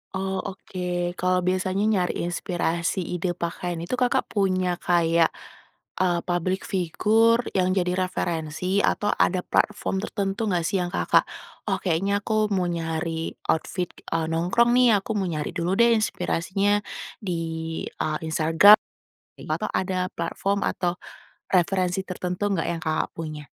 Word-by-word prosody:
Oh, 190 0 -2
oke. 180 -2 -3
Kalau 180 0 +2
biasanya 185 +2 0
nyari 195 -6 +1
inspirasi 175 +1 -1
ide 175 0 -2
pakaian 175 0 -3
itu, 250 +8 -3
Kakak 250 -1 +2
punya 185 -3 +1
kayak, 170 -1 +3 0.7
eee, 175 -2 +2
publik 185 +1 -1
figur 220 +6 +3
yang 185 0 +2
jadi 180 -1 +1
referensi 175 +2 -2
atau 205 0 +1
ada 180 0 +2
platform 205 -2 0
tertentu 200 +1 -2
nggak 175 -4 +1
sih 195 - 0
yang 175 - -1
Kakak, - - +3 0.4
"Oh - - +2
kayaknya 195 +3 +1
aku 215 -1 +1
mau 180 -1 +1
nyari 165 0 -3 0.2
outfit, 180 +2 -2 0.2
eee, 165 -1 0
nongkrong 180 +9 +3
nih, 240 -5 +5
aku - - -4
mau 190 -2 0
nyari 150 -2 -3
dulu 175 +3 0
deh 235 0 +6
inspirasinya 200 0 0 0.4
di, 180 -5 -3 0.5
eee, 155 0 -2
Instagram," 160 +7 +7 0.6
ei, - - -10
atau - - -1
ada 185 -1 -1
platform 200 +1 -1
atau 175 -1 0 0.6
referensi 185 0 +2
tertentu 180 +2 -2
gak 165 - -1
yang 165 -1 -3
Kakak 155 0 -1
punya? 155 -2 -6
180 Hz, 140 wpm, -25 LUFS, 170-195 Hz, 0.7 s, Instagram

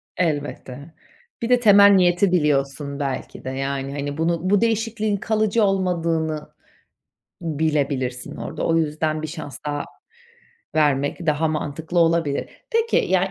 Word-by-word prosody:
Elbette. 145 -2 -3 0.5
Bir 230 - -2
de 250 -1 +5
temel 205 -3 +7
niyeti 180 0 +4
biliyorsun 140 -3 0
belki 135 -2 -4
de. 130 - -4
Yani, 135 +1 -3
hani, 145 +1 -4
bunu 170 +2 0
bu 205 +1 +3
değişikliğin 225 -2 0
kalıcı 215 +1 +1
olmadığını 165 -5 0 0.9
bilebilirsin 145 -5 -1
orada. - - -5
O 165 - +2
yüzden 155 0 -1
bir 155 - -4
şans 150 -5 -7
daha 145 -1 -2 0.9
vermek 145 +2 +1
daha 155 +1 +2
mantıklı 155 +3 -3
olabilir. 165 -4 +2 0.2
Peki, 460 0 +1
ya, 190 0 +2
160 Hz, 125 wpm, -22 LUFS, 145-185 Hz, 0.9 s, temel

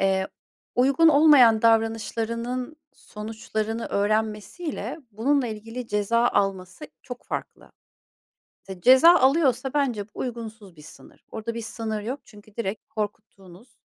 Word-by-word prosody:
Eee, 190 0 +1 0.5
uygun 275 +6 +4
olmayan 285 -7 +6
davranışlarının 230 +4 0 0.2
sonuçlarını 220 +1 -5
öğrenmesiyle 215 - -2
bununla 255 +5 +1
ilgili 225 +2 -7
ceza 230 +3 +1
alması 190 +4 -2 0.2
çok 250 -2 -9
farklı. - - -7 1.1
Ceza 260 - +7
alıyorsa 265 -2 +2
bence 255 -8 0
bu - - -17
uygunsuz 225 -6 -7
bir 150 - -14
sınır. - - -16
Orada 225 +1 -5
bir 230 - -5
sınır 220 -2 -4
yok 255 +6 -5
çünkü 210 -1 -18
direkt 220 -2 -4
korkuttuğunuz, 210 0 -8
225 Hz, 110 wpm, -24 LUFS, 210-250 Hz, 1.1 s, Ceza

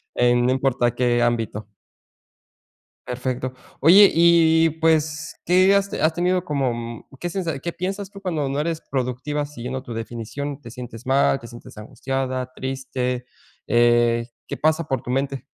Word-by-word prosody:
en 120 0 +3
no 125 - +3
importa 130 -2 +1
qué 120 -1 +2
ámbito. 115 -3 -1 1.4
Perfecto. 125 +1 -3 0.3
Oye, 190 +7 +8
y 165 -1 +5
pues, 160 -1 0
¿qué 185 +3 +5
has 200 0 +1
has 160 +1 +1
tenido 180 +1 +1
como 135 -6 0
mm, 115 -1 -7 0.2
qué 175 - -3
sensa, 170 -5 -3
qué 170 +4 -4
piensas 195 +2 -4
tú 195 - -11
cuando 165 -7 -1
no 140 - -2
eres 160 +1 -2
productiva 135 +3 -2
siguiendo 130 -2 -6
tu 120 -3 -8
definición, 120 +5 -5
te 120 - -10
sientes 120 0 -9
mal, 135 0 +3
te 120 - -11
sientes 120 0 -12
angustiada, 130 +3 -3
triste, 130 -1 -3 0.4
eh, 120 0 +3 0.2
qué - - -5
pasa 155 +2 +2
por 130 -3 -1
tu - - -10
mente? 135 +1 -1
135 Hz, 155 wpm, -22 LUFS, 120-160 Hz, 1.4 s, Oye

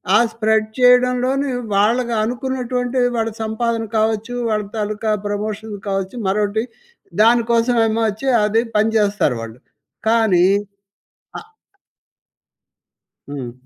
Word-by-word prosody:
ఆ - - +8 0.2
స్ప్రెడ్ 220 -1 +1
చేయడంలోనే 250 +2 +3 0.2
వాళ్ళకి 235 +4 +2
అనుకున్నటువంటి 250 +1 -2 0.3
వాళ్ళ - - -2
సంపాదన 225 +1 -2
కావచ్చు, 220 +2 0
వాళ్ళ 215 -1 0
తాలూకా 215 +1 -2 0.2
ప్రమోషన్ 210 +1 -4
కావచ్చు 195 +3 -3
మరొకటి 210 +2 0 0.6
దాని 235 +1 +5
కోసమేమో 230 -1 +2
వచ్చి 220 +7 -5 0.2
అది 220 +2 +2 0.2
పనిచేస్తారు 210 - +1
వాళ్ళు. 115 0 -8 0.5
కానీ 220 -6 +3 0.9
ఆహ్! 440 - -16 1.8
హ్మ్. 130 -4 -5
220 Hz, 95 wpm, -19 LUFS, 210-245 Hz, 1.8 s, ఆ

